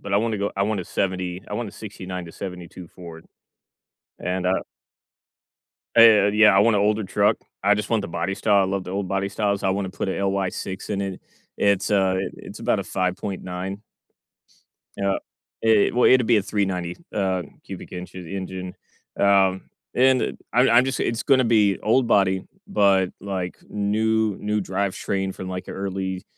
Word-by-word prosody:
But 100 - -6
I - - +5
wanna 110 -1 0
go 100 - -2
I 100 - +1
want 105 0 0
a - - -6
'70 90 -1 -2
I - - -4
want 115 0 -3
a - - -12
'69 95 -4 -7
to 85 - -11
'72 90 -1 -8
Ford. 85 -2 -11 0.9
And, 90 0 -2
uh 95 - +1 1.3
Eh 110 -3 +7
yeah, 105 -2 +6
I - - +6
want 115 +1 +4
a - - +3
older 105 +1 +1
truck. 100 +3 +2 0.3
I 105 +2 +5
just 105 - -4
want 115 -2 +2
the 100 - -5
body 85 +3 -2
style, 100 -1 +3
I - - +2
love 95 0 -2
the - - -7
old 95 0 -3
body 100 +1 -1
styles. 100 0 -1
I - - +1
wanna 95 -1 -2
put - - -4
a - - 0
LY6 95 -1 -2
in 100 -2 -2
it. 95 -1 -5 0.4
It's 100 -1 +2
a 95 -2 +2 0.2
it's - - -10
about - - +1
a - - -3
5.9. 95 +1 -3 1.1
Yeah. 100 0 0
I - - -2 0.5
it 110 -1 +4
well, 125 - +5
it'd 125 -2 +5
be 115 - +4
a 105 - +2
390, 90 -4 -2 0.2
uh, 95 -3 0 0.2
cubic - - -9
inch 90 0 -7
engine. 95 0 -6 0.4
Um, 95 -1 +3 0.2
and 130 0 +3 0.2
I'm 125 +2 +4
I'm 120 +2 +6
just 135 - -2
it's 115 0 -1
gonna 130 -2 +4
be 105 -5 +3
old 120 +3 +3
body, 95 -4 +2 0.2
but, 100 - +3
like, 95 -2 -4
new 110 +1 0
new 105 0 -1
drivetrain 95 0 -2
from, 95 - -7
like, 90 0 -5
a - - -5
early, 95 -1 -4
100 Hz, 180 wpm, -23 LUFS, 95-105 Hz, 1.3 s, Eh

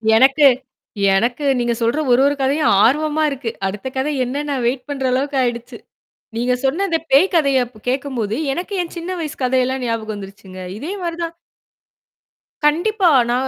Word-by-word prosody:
எனக்கு 270 +5 +5 0.7
எனக்கு 240 +8 0
நீங்க 240 -1 0
சொல்ற 235 +6 +1
ஒரு 245 - +4
ஒரு 285 +1 +2
கதையும் 285 +1 +2
ஆர்வமா 305 +4 +2
இருக்கு. 270 -4 -4 0.2
அடுத்த 205 +5 -5
கதை 270 +3 0
என்னன்னு 285 +3 -3
வெயிட் 250 +3 -1
பண்ற 270 -2 -3
அளவுக்கு 275 +2 -1
ஆயிடுச்சு. 240 -1 -3 0.6
நீங்க 245 +2 +1
சொன்ன 320 +9 +1
இந்த 325 -1 +1
பேய் 280 +8 +6
கதைய 275 -5 +3
அப்ப 225 -2 -18
கேட்கும்போது, 255 -5 -2 0.2
எனக்கு 355 +6 -5
என் 340 - -10
சின்ன 340 +2 -5
வயசு 305 -3 -5
கதையெல்லாம் 255 +1 +1
ஞாபகம் 225 -2 -2
வந்துருச்சுங்க. 195 -1 -10 0.2
இதே 295 - -5
மாரி 340 -1 -3
தான் 335 0 -5 1.3
கண்டிப்பா. 355 +5 +3 0.2
நான் 250 +2 0
265 Hz, 155 wpm, -19 LUFS, 240-300 Hz, 1.3 s, பேய்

